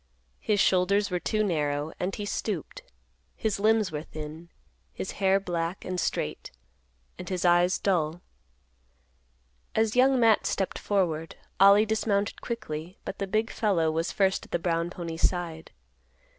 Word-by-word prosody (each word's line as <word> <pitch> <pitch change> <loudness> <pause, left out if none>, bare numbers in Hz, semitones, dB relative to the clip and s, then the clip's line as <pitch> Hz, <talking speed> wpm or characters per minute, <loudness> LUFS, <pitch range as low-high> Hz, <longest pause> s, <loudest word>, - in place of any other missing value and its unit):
His 210 -1 0
shoulders 195 +2 +3
were 180 - 0
too 215 +4 0
narrow 150 -5 -1
and 185 +2 -2
he 205 - -4
stooped; - - -4 0.5
his 215 -3 -1
limbs 215 -2 +3
were 150 -1 -3
thin; 155 +2 -9 0.4
his - - -5
hair 195 0 +4
black 175 -1 -3
and 185 0 -3
straight; - - -2 0.7
and 180 - -6
his 185 -2 -2
eyes 175 +1 +4
dull. 175 -3 0 1.5
As 220 0 +2
Young 260 +1 +5
Matt 225 -3 +4
stepped 195 - -2
forward, 165 -6 -1 0.2
Ollie 200 +2 +7
dismounted 215 -1 0
quickly, 180 -7 -5
but - - -6
the 195 - -2
big 215 +3 0
fellow 180 -8 +1
was 165 +2 -1
first 190 -1 +1
at - - -18
the - - +1
brown 170 0 -1
pony's 170 -2 0
side. 170 -3 -6
185 Hz, 145 wpm, -27 LUFS, 165-205 Hz, 1.5 s, Ollie